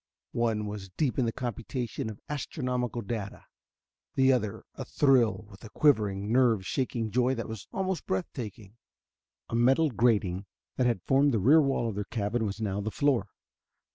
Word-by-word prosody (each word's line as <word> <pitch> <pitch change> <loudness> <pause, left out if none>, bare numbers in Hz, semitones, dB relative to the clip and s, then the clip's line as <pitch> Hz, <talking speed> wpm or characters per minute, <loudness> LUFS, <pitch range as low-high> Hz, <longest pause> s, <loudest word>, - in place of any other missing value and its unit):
One 110 -2 0
was 105 -2 -6
deep 135 - -1
in 125 - +2
the 115 - 0
computation 120 +1 -4
of 105 - -9
astronomical 125 -5 -3
data; 100 -1 -5 0.7
the 135 0 +5
other 110 -5 -2
athrill 130 -7 +2
with 100 - -15
a 110 - -9
quivering, 105 -8 +2
nerve 115 -6 +3
shaking 115 -2 -2
joy 125 +3 +2
that 115 - -4
was 110 -3 -7
almost 190 -4 -2
breath 95 -1 0
taking. 110 -3 -8 0.7
A - - -4
metal 135 +6 +4
grating 100 -5 +1 0.3
that 125 - +3
had 115 -7 0
formed 135 -1 +3
the - - +2
rear 145 +11 +6
wall 135 -4 +1
of 110 - -2
their 100 0 -3
cabin 110 +1 -1
was 100 +1 -5
now 100 -2 -1
the 105 - -2
floor. 130 -4 +1
115 Hz, 170 wpm, -29 LUFS, 105-130 Hz, 0.7 s, rear